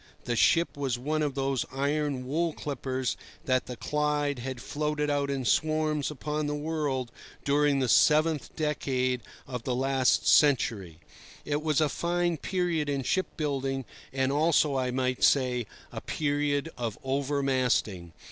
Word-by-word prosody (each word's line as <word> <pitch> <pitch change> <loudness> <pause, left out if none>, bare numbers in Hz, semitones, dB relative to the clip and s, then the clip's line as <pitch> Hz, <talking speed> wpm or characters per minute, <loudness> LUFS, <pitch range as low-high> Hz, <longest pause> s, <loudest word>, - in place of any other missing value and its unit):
The 120 - -1
ship 170 +8 +3
was 135 -4 -1
one 155 +5 -1
of 145 -3 -1
those 135 -2 0
iron 140 -1 -1
wool 160 +5 0
clippers 130 -6 -3 0.3
that 130 -3 +1
the 125 - -5
Clyde 150 -1 0
had 130 0 -5
floated 150 +2 -2
out 140 -1 0
in 135 -2 -2
swarms 155 +2 +1
upon 150 +1 -3
the 150 - -1
world 145 -5 -2 0.3
during 145 0 +3
the 130 -2 +1
seventh 155 +4 +3
decade 130 -5 0 0.2
of 125 -2 -5
the 125 +1 -2
last 130 0 +2
century. 115 - +3 0.5
It 145 0 -1
was 155 -1 +1
a 155 - +3
fine 175 +2 0
period 170 -3 -1
in 140 -2 -1
ship 185 +8 0
building, 135 -3 -2 0.3
and 135 0 0
also, 150 -1 +3
I 130 -1 0
might 130 0 -1
say, 125 -4 +3 0.2
a - - -6
period 145 0 -1
of 115 -3 -3
over 140 +1 -1
masting. 115 -10 0
140 Hz, 150 wpm, -28 LUFS, 130-150 Hz, 0.5 s, ship